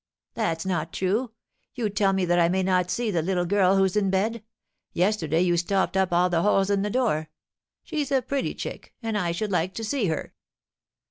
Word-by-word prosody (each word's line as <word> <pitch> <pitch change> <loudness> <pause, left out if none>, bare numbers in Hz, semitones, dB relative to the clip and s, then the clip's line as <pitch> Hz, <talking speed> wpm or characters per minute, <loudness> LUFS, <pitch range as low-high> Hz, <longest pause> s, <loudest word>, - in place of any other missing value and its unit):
"That's 165 -7 -2
not 170 -4 -2
true. 210 +7 0 0.5
You 240 -4 -1
tell 200 -1 +2
me 190 -1 +1
that 175 0 +2
I 170 0 +4
may 190 +1 +1
not 180 -1 +1
see 235 +2 -1
the 170 -4 +1
little 180 +1 0
girl 195 0 +3
who's 190 -1 +2
in 200 -2 +2
bed. 210 +4 0 0.5
Yesterday 175 -4 +1
you 175 -1 +2
stopped 190 +3 0
up 190 -1 +2
all 175 +1 +3
the 170 -2 +1
holes 195 0 +2
in 200 -1 +2
the 205 - -1
door. 205 -11 0 0.5
She's 295 -4 -3
a 265 -2 +2
pretty 275 +2 -2
chick, - - -7
and 225 -1 -2
I 180 -5 0
should 205 +5 -3
like 180 +1 0
to 225 - -4
see 225 -1 0
her. 160 -2 -3
190 Hz, 205 wpm, -25 LUFS, 175-215 Hz, 0.5 s, I